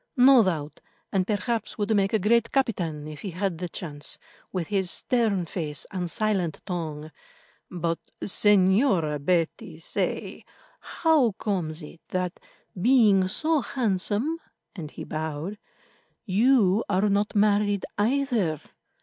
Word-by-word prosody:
"No 255 Hz, 0 st, +8 dB
doubt, 155 Hz, -6 st, -3 dB, 0.3 s
and 190 Hz, -1 st, +1 dB
perhaps 220 Hz, +2 st, -2 dB
would 215 Hz, +1 st, +1 dB
make 195 Hz, -1 st, +2 dB
a 220 Hz, -, +3 dB
great 230 Hz, +3 st, +2 dB
captain, 175 Hz, -, -1 dB
if 155 Hz, -1 st, -8 dB
he 200 Hz, -, -4 dB
had 180 Hz, -1 st, -2 dB
the 180 Hz, -1 st, -4 dB
chance, 150 Hz, -4 st, -6 dB, 0.3 s
with 180 Hz, -3 st, -2 dB
his 195 Hz, -3 st, 0 dB
stern 220 Hz, -7 st, +1 dB
face 155 Hz, -4 st, -4 dB
and 180 Hz, -2 st, -3 dB
silent 195 Hz, -6 st, 0 dB
tongue. 155 Hz, -4 st, -5 dB, 0.6 s
But, 170 Hz, -1 st, -2 dB, 0.2 s
Señora 190 Hz, -, +3 dB
Betty, 170 Hz, +2 st, 0 dB
say, 165 Hz, -, -3 dB, 0.4 s
how 305 Hz, -, +2 dB
comes 175 Hz, -6 st, -3 dB
it 160 Hz, +2 st, -12 dB
that, 180 Hz, -1 st, -3 dB, 0.4 s
being 215 Hz, -6 st, +5 dB
so 310 Hz, +9 st, +1 dB
handsome," 235 Hz, -, -1 dB, 0.4 s
and 160 Hz, -6 st, -6 dB
he -, -, -8 dB
bowed, 160 Hz, +6 st, -4 dB, 0.7 s
"you 215 Hz, -1 st, +3 dB
are 200 Hz, +1 st, +2 dB
not 205 Hz, +1 st, 0 dB
married 205 Hz, -1 st, +2 dB
either? 225 Hz, -, +1 dB
195 Hz, 125 wpm, -26 LUFS, 170-220 Hz, 0.7 s, No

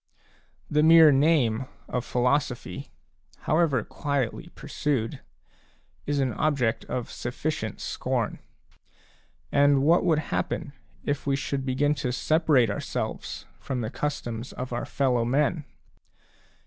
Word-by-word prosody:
The 150 Hz, -, +2 dB
mere 160 Hz, -1 st, +8 dB
name 135 Hz, -5 st, +3 dB, 0.2 s
of 125 Hz, -, -2 dB
philosophy, 125 Hz, +1 st, -1 dB, 0.5 s
however 155 Hz, -7 st, +2 dB
quietly 140 Hz, +5 st, -3 dB
pursued, 140 Hz, -5 st, -2 dB, 0.9 s
is 145 Hz, 0 st, 0 dB
an 130 Hz, -4 st, +1 dB
object 125 Hz, -5 st, 0 dB
of 125 Hz, -2 st, -4 dB
sufficient 120 Hz, -1 st, -4 dB
scorn; -, -, -2 dB, 1.1 s
and 140 Hz, -1 st, +4 dB
what 165 Hz, +4 st, +4 dB
would 165 Hz, -4 st, +3 dB, 0.2 s
happen 140 Hz, -, -2 dB, 0.3 s
if 145 Hz, 0 st, -2 dB
we 140 Hz, -, +3 dB
should 135 Hz, 0 st, -3 dB
begin 145 Hz, +3 st, +2 dB
to 125 Hz, -, -1 dB
separate 145 Hz, -4 st, +3 dB
ourselves 100 Hz, -, -4 dB
from 130 Hz, -3 st, -3 dB
the 110 Hz, 0 st, -3 dB
customs 120 Hz, -5 st, -4 dB
of 125 Hz, -1 st, -5 dB
ourfellow 125 Hz, 0 st, 0 dB
men 145 Hz, +5 st, +1 dB
140 Hz, 110 wpm, -26 LUFS, 125-150 Hz, 1.1 s, mere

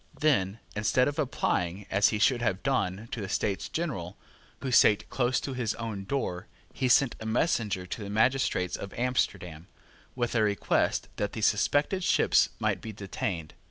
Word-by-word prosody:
Then, 105 Hz, -10 st, +2 dB, 0.2 s
instead 110 Hz, +4 st, +2 dB
of 145 Hz, +2 st, -3 dB
applying, 100 Hz, -, -1 dB
as 100 Hz, +2 st, +4 dB
he 110 Hz, -, 0 dB
should 120 Hz, +3 st, +3 dB
have 95 Hz, -5 st, -1 dB
done, 110 Hz, -6 st, -1 dB
to 115 Hz, -, -4 dB
the 95 Hz, -, -5 dB
States 100 Hz, 0 st, -1 dB
General, 120 Hz, -, -4 dB, 0.4 s
who 130 Hz, -, -3 dB
sate 105 Hz, -4 st, +5 dB
close 125 Hz, -1 st, +1 dB
to 135 Hz, -, -4 dB
his 120 Hz, -4 st, -2 dB
own 110 Hz, -4 st, -5 dB
door, 95 Hz, -7 st, -3 dB, 0.3 s
he 130 Hz, -, 0 dB
sent 125 Hz, 0 st, +4 dB
a 110 Hz, -, -7 dB
messenger 110 Hz, -, 0 dB
to 95 Hz, +4 st, -6 dB
the 100 Hz, -, -6 dB
magistrates 110 Hz, -4 st, +1 dB
of 100 Hz, -, -7 dB
Amsterdam, 90 Hz, -9 st, -1 dB, 0.5 s
with 120 Hz, -2 st, -1 dB
a 115 Hz, -, +2 dB
request 105 Hz, -1 st, +1 dB
that 105 Hz, -, -2 dB
the 110 Hz, -, -4 dB
suspected 145 Hz, -, +2 dB
ships -, -, +4 dB
might -, -, 0 dB
be 110 Hz, -, -6 dB
detained. 95 Hz, -5 st, -4 dB
110 Hz, 170 wpm, -28 LUFS, 95-125 Hz, 0.5 s, sate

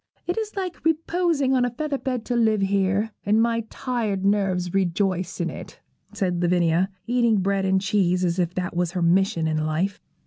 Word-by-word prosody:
It 355 Hz, -, -1 dB
is 435 Hz, -2 st, -4 dB
like 370 Hz, -3 st, -4 dB
reposing 325 Hz, -3 st, +1 dB
on 255 Hz, -1 st, +3 dB
a 245 Hz, -, +1 dB
feather 280 Hz, +3 st, -3 dB
bed 250 Hz, -4 st, -3 dB
to 245 Hz, -, -1 dB
live 220 Hz, -3 st, +2 dB
here, 195 Hz, +2 st, +1 dB
and 210 Hz, +2 st, +2 dB
my 230 Hz, 0 st, +1 dB
tired 220 Hz, -7 st, -2 dB
nerves 190 Hz, -3 st, +1 dB
rejoice 185 Hz, -1 st, 0 dB
in 170 Hz, -1 st, -1 dB
it,' -, -, -10 dB, 0.3 s
said 180 Hz, -3 st, -1 dB
Lavinia, 175 Hz, +1 st, +2 dB, 0.2 s
eating 235 Hz, -2 st, +2 dB
bread 195 Hz, 0 st, 0 dB
and 190 Hz, 0 st, +3 dB
cheese 190 Hz, -2 st, +1 dB
as 175 Hz, +1 st, 0 dB
if 175 Hz, 0 st, -1 dB
that 180 Hz, -1 st, -3 dB
was 175 Hz, -1 st, 0 dB
her 180 Hz, -, -1 dB
mission 170 Hz, -1 st, +2 dB
in 155 Hz, -1 st, 0 dB
life. 160 Hz, +6 st, -1 dB
195 Hz, 185 wpm, -24 LUFS, 180-240 Hz, 0.3 s, on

